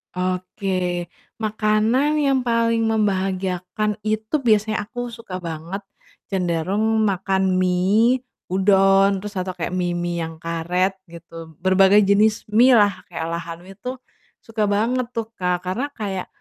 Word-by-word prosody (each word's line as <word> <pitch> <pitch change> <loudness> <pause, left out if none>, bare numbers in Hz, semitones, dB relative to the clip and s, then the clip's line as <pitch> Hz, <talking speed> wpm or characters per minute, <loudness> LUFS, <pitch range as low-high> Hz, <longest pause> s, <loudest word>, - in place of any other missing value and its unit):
oke, 185 +1 -2 0.7
makanan 220 +7 +2
yang 275 -3 +2
paling 230 -1 +2
membahagiakan 195 -1 -1
itu 220 +7 0
biasanya 215 -3 +1
aku 245 +1 -5
suka 230 -5 -8
banget 170 +4 -5 0.5
cenderung 195 +5 0
makan 190 -1 0 0.2
mie, 205 +8 +2 0.2
udon 195 +1 +4
terus 205 +1 -8
atau 185 0 -2
kayak 180 0 -4
mie-mie 175 -1 -1
yang 160 0 -6
karet 175 +4 -1 0.2
gitu, 165 -1 -11
berbagai 190 +2 +5
jenis 210 +2 +3
mie 230 +5 +5
lah, 200 -3 +2
kayak 165 0 -4
olahan 170 0 -5
mie 190 +2 -13
itu 250 +6 -6 0.4
suka 225 -1 -3
banget 230 +5 0
tuh, 230 -2 -3
Kak, 180 -1 0
karena 255 +10 -2
kayak 195 -7 -4
195 Hz, 130 wpm, -22 LUFS, 180-220 Hz, 0.7 s, berbagai